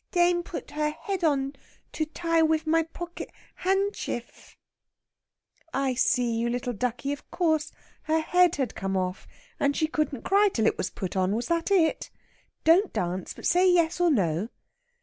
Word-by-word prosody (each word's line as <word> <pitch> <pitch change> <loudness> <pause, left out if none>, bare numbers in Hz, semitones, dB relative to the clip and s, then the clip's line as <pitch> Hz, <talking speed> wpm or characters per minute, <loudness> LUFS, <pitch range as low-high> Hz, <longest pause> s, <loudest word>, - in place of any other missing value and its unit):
Dane 350 -1 +3
put 345 - -7
her 300 0 0
head 365 +4 -4
on 275 -3 +1 0.4
to 310 - -1
ty 330 +1 0
wiv 320 0 +2
my 325 +1 +3
pocket 345 +2 -7 0.3
hanshtiff!" 385 - -2 1.2
"I 270 -1 +1
see, 245 -2 +1
you 235 +1 0
little 245 0 -2
ducky, 250 +5 -2
of 285 - -10
course 315 -3 0 0.3
her 315 +1 +2
head 355 +2 +3
had 265 -3 -2
come 195 0 -2
off, 185 0 -3 0.3
and 280 0 +1
she 315 - +2
couldn't 305 -5 -2
cry 405 +1 +4
till 220 -9 0
it - - +1
was - - -1
put 185 -1 -5
on, 190 +2 +1
was 240 +7 -3
that 335 +1 0
it? 350 -5 +2 0.5
Don't 360 +5 +5
dance, 180 +1 -3
but - - -9
say 365 +1 +4
yes 345 -1 +2
or 350 - +4
no." 195 - +1
310 Hz, 170 wpm, -27 LUFS, 240-345 Hz, 1.2 s, Don't